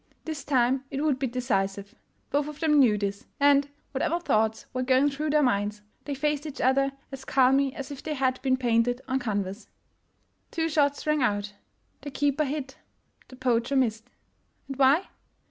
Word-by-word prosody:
This 310 Hz, -3 st, -5 dB
time 260 Hz, -1 st, +2 dB
it 275 Hz, 0 st, -3 dB
would 290 Hz, -4 st, +1 dB
be 265 Hz, -, 0 dB
decisive! 200 Hz, -5 st, -2 dB, 0.4 s
Both 290 Hz, +1 st, +1 dB
of 300 Hz, -1 st, -8 dB
them 305 Hz, -3 st, +3 dB
knew 230 Hz, -6 st, +5 dB
this 200 Hz, 0 st, -4 dB
— -, -, -45 dB
and, 285 Hz, 0 st, +4 dB, 0.2 s
whatever 310 Hz, +5 st, 0 dB
thoughts 220 Hz, -8 st, 0 dB
were 255 Hz, -, -1 dB
going 260 Hz, +3 st, +3 dB
through 300 Hz, +3 st, -3 dB
their 300 Hz, 0 st, +3 dB
minds, 210 Hz, -3 st, 0 dB, 0.2 s
they 285 Hz, -, -3 dB
faced 295 Hz, +2 st, -1 dB
each 290 Hz, -1 st, -8 dB
other 275 Hz, +1 st, +2 dB, 0.2 s
as 270 Hz, -1 st, -8 dB
calmly 270 Hz, +1 st, +3 dB
as 275 Hz, +1 st, -6 dB
if 280 Hz, -, -7 dB
they 310 Hz, -1 st, -4 dB
had 260 Hz, -1 st, 0 dB
been 260 Hz, -1 st, +2 dB
painted 245 Hz, 0 st, +1 dB
on 265 Hz, 0 st, 0 dB
canvas. 205 Hz, -3 st, -3 dB, 0.8 s
Two 325 Hz, -1 st, -1 dB
shots 285 Hz, -2 st, +1 dB
rang 300 Hz, -1 st, +1 dB
out. 205 Hz, -3 st, 0 dB, 0.5 s
The 285 Hz, -, -6 dB
keeper 285 Hz, +2 st, 0 dB
hit, 275 Hz, -1 st, -5 dB, 0.5 s
the 255 Hz, -, -13 dB
poacher 250 Hz, +1 st, 0 dB
missed. 230 Hz, -3 st, 0 dB, 0.6 s
And 275 Hz, -, -6 dB
why? 275 Hz, +6 st, +5 dB
265 Hz, 180 wpm, -27 LUFS, 240-285 Hz, 0.8 s, knew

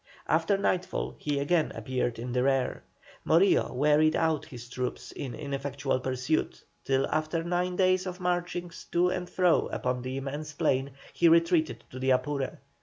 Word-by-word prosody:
After 200 Hz, -, +2 dB
nightfall 185 Hz, -2 st, -1 dB
he 145 Hz, -1 st, -1 dB
again 155 Hz, +3 st, +1 dB
appeared 130 Hz, -3 st, -2 dB
in 120 Hz, +2 st, -5 dB
the 125 Hz, 0 st, +1 dB
rear. 135 Hz, 0 st, +1 dB, 0.4 s
Morillo 175 Hz, +5 st, +4 dB
wearied 150 Hz, +4 st, +3 dB
out 160 Hz, -2 st, +1 dB
his 120 Hz, -2 st, -10 dB
troops 125 Hz, +1 st, -4 dB
in 130 Hz, -4 st, -6 dB
ineffectual 140 Hz, -2 st, -2 dB
pursuit, 130 Hz, +4 st, -1 dB, 0.2 s
till 135 Hz, 0 st, +2 dB
after 155 Hz, +2 st, -1 dB
nine 180 Hz, +1 st, -1 dB
days 185 Hz, 0 st, +2 dB
of 180 Hz, 0 st, -5 dB
marchings 175 Hz, -1 st, -3 dB
to 175 Hz, +1 st, +4 dB
and 180 Hz, -1 st, -3 dB
fro 180 Hz, -2 st, +3 dB
upon 125 Hz, 0 st, -2 dB
the 130 Hz, +1 st, -4 dB
immense 145 Hz, +3 st, -5 dB
plain, 135 Hz, -1 st, 0 dB, 0.2 s
he 170 Hz, -, +4 dB
retreated 165 Hz, -1 st, +3 dB
to 130 Hz, -, -7 dB
the 130 Hz, +1 st, 0 dB
Apure. 135 Hz, +1 st, 0 dB
150 Hz, 160 wpm, -28 LUFS, 130-175 Hz, 0.4 s, Morillo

